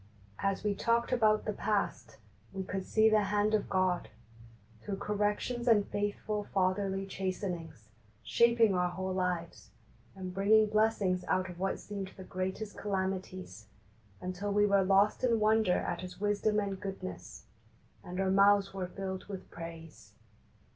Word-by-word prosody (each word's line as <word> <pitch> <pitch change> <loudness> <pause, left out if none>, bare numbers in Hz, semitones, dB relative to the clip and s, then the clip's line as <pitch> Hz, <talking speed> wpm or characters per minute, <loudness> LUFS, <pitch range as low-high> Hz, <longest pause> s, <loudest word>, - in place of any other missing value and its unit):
As 195 -1 -1
we 210 -1 +1
talked 230 +4 +1
about 215 -4 +3
the 215 - -1
past 210 0 -2 0.4
we 190 - -3
could 190 0 -4
see 220 0 +4
the 215 -1 +4
hand 205 +2 +1
of 215 - +1
God, 185 -2 +1 0.7
through 200 -2 -4
corrections 210 +4 -1
and 210 -4 +5
faithful 205 +1 -2
Fatherly 195 0 0
chastenings, 180 - -4 0.3
shaping 235 -3 +4
our 180 -1 +1
whole 185 +1 -3
lives, 180 -2 -3 0.5
and 185 -1 -6
bringing 210 +3 +5
blessings 215 -4 +1
out 185 -1 0
of 175 - -12
what 195 +1 0
seeined 200 -2 -6
the 190 - -8
greatest 190 +3 -4
calamities, 190 - -3 0.5
until 185 +3 -4
we 205 +1 +4
were 200 -1 +4
lost 195 +4 +3
in 235 -3 +3
wonder 215 -3 +3
at 175 - -3
His 180 0 -8
wisdom 210 +1 +1
and 200 -2 -3
goodness, 195 -1 -7 0.6
and 180 +1 -6
our 190 -1 +1
mouths 200 0 +4
were 190 -2 -3
filled 190 0 -5
with 195 -2 -8
praise. 160 - -10
195 Hz, 145 wpm, -32 LUFS, 185-210 Hz, 0.7 s, and